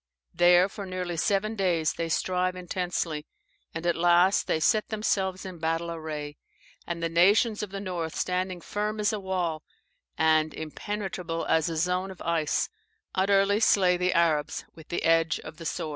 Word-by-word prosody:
There 175 +1 +5
for 200 0 -8
nearly 180 -2 -3
seven 200 +6 0
days 175 -6 +1
they 165 0 -3
strive 180 +2 0
intensely, 175 -4 -3 0.4
and 160 +1 -6
at 175 - +2
last 175 +3 +4
they 160 - +1
set 210 +7 +2
themselves 195 -4 -1
in 185 -3 -8
battle 165 +1 -1
array; 150 -3 -6 0.5
and 170 -1 -4
the - - +2
nations 200 +6 +3
of 210 - -4
the 195 +1 -5
north 175 -5 -4
standing 185 -1 -2
firm 210 +3 -3
as 210 0 +1
a 215 - -2
wall, 180 -5 -2 0.6
and 155 -1 +3
impenetrable 180 0 -4
as 160 0 +2
a 165 - -3
zone 180 +3 0
of 190 - -10
ice, 165 -2 0 0.5
utterly 195 +1 +3
slay 185 -5 +4
the 180 +1 +1
Arabs 160 -4 +1
with 160 -2 -14
the 175 - -3
edge 165 -1 +3
of 155 - -10
the 165 -1 -5
sword." 155 - -3
175 Hz, 170 wpm, -27 LUFS, 165-190 Hz, 0.6 s, There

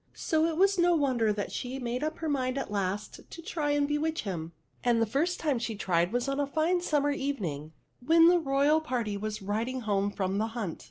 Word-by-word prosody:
So 320 0 +1
it 325 -1 -2
was 390 0 +3
no 345 0 +4
wonder 255 -8 +2
that 205 -1 -3
she 255 +1 -4
made 250 +1 -3
up 310 +1 -2
her 320 - -4
mind, 260 -3 0
at 270 - -3
last, 200 0 -2
to 335 - -9
try 315 -6 -2
and 290 0 +2
bewitch 310 +2 -1
him; 170 -5 -4 0.3
and 240 -1 +3
the 225 - +3
first 295 - 0
time 290 -6 0
she 230 -1 -3
tried 175 -3 +1
was 245 +2 -1
on 275 +1 -1
a 285 - +1
fine 320 +5 +1
sum 300 -5 +1
mer 290 - +2
evening, 190 - -3 0.3
when 330 +4 +6
the 350 0 +5
royal 290 +1 +2
party 240 -9 -2
was 215 0 -4
riding 230 +6 -2
home 205 -2 0
from 195 -1 -2
the 220 - 0
hunt. 195 -8 -3
260 Hz, 225 wpm, -29 LUFS, 210-310 Hz, 0.3 s, when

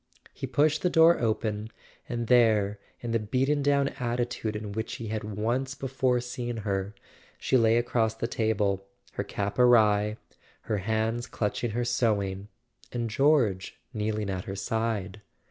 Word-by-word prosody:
He 135 - -5
pushed 150 +4 +2
the 180 - +2
door 165 0 +6
open, 110 -2 -1 0.4
and 120 -1 -2
there, 110 -4 +3 0.2
in 120 - -4
the 115 - +2
beaten 130 +7 0
down 140 0 +2
attitude 120 -3 -2
in 105 -1 -5
which 110 +2 -4
he 115 -2 -6
had 110 0 -3
once 115 +6 -2
before 130 -2 0
seen 120 -1 -4
her, 100 0 -2 0.4
she - - 0
lay 115 -2 +5
across 115 -2 +1
the 115 - -3
table, 105 -4 0 0.3
her - - -2
cap 100 +3 -3
awry, 105 -3 +4 0.4
her 105 -2 -2
hands 110 +3 -1
clutch¬ 105 -1 -2
ing 120 - +1
her 120 0 0
sewing, 105 -5 0 0.4
and 120 -2 -3
George 120 -8 +2 0.2
kneeling 105 -2 -2
at 95 -1 -4
her 95 - -5
side. 105 -1 -2
115 Hz, 155 wpm, -28 LUFS, 105-125 Hz, 0.4 s, door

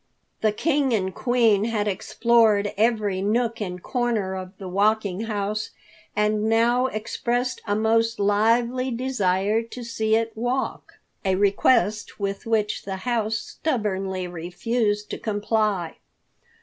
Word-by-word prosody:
The 215 - +3
King 280 +2 +1
and 190 -2 -1
Queen 230 -4 +2
had 215 -2 -1
explored 215 0 +2
every 210 -3 +1
nook 230 +2 0
and 180 -3 -5
corner 235 -6 -1
of 185 -1 -6
the 190 - -7
Walking 205 +1 +1
House, 210 -1 -2 0.5
and 210 +1 +1
now 240 +3 +3
expressed 245 +2 -2
a 205 - +1
most 225 +1 +2
lively 230 +5 +2
desire 220 -4 0
to 230 +2 -9
see 220 -1 0
it 225 0 0
walk, 245 +4 -2 0.3
a 190 -1 +2
request 205 +1 +2
with 200 +1 -3
which 215 -2 0
the 195 -1 -4
House 225 -3 0
stubbornly 195 - -2
refused 205 +5 -2
to - - -4
comply. 205 -4 -1
215 Hz, 125 wpm, -24 LUFS, 200-230 Hz, 0.5 s, The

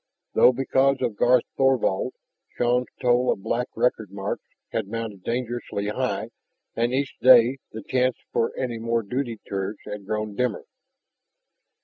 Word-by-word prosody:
Though, - - +7
because 135 +1 +2
of 110 - -1
Garth 120 +3 +4
Thorvald, 130 -4 +2 0.4
Shann's 125 +1 +2
toll 125 0 +3
of 95 - -4
black 125 +1 -1
record 110 -4 +1
marks 100 +1 -4 0.3
had - - -2
mounted 110 -3 -5
dangerously 120 -4 -3
high 105 - -2 0.4
and 120 +1 +1
each 135 +1 -2
day 130 +1 +7
the 110 -1 -7
chance 130 0 +1 0.2
for 115 - +1
any 120 -3 -2
more 115 0 0
duty 120 +1 -3
tours 100 +1 -3
had 105 -2 -7
grown 105 -1 -2
dimmer. 125 -2 -1
120 Hz, 140 wpm, -25 LUFS, 105-125 Hz, 0.4 s, Though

